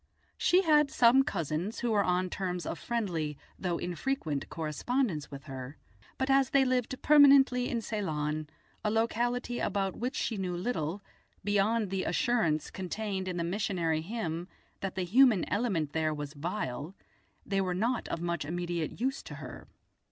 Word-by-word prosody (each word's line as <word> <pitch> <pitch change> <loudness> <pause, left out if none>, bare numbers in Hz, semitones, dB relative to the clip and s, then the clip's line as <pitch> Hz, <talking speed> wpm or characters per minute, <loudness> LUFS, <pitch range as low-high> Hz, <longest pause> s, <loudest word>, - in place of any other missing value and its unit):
She 365 +2 +3
had 300 -3 +5
some 245 +2 +6
cousins 175 - -2
who 240 - 0
were 205 -2 +3
on 180 0 0
terms 180 -2 -3
of - - -4
friendly, 170 - -2 0.2
though 175 -2 -1
infrequent, 175 - -2
correspondence 165 - -1
with 140 -1 -9
her, 135 +1 -8 0.4
but 265 - 0
as 270 -1 +4
they 275 -1 +4
lived 255 0 0
permanently 275 -4 +6
in 235 - -1
Ceylon, 155 -8 -2 0.3
a 210 - +1
locality 240 +2 0
about 195 -1 -1
which 250 +4 -3
she 225 - -1
knew 180 -2 -2
little, 180 -2 -2 0.4
beyond 205 +1 +1
the 190 -1 -1
assurance 175 - +1
contained 190 0 -3
in 180 -1 -3
the 170 - 0
missionary 175 -4 0
hymn 175 -3 -4 0.3
that 195 -1 -4
the 190 - -1
human 220 +1 +5
element 185 -10 0
there 155 -1 0
was 145 0 -6
vile, 160 0 -4 0.5
they 195 -1 0
were 180 -1 -1
not 235 +6 0
of 170 - -3
much 170 -2 -1
immediate 175 +1 -3
use 265 +5 -1
to - - -9
her. - - -9
190 Hz, 160 wpm, -30 LUFS, 165-240 Hz, 0.5 s, some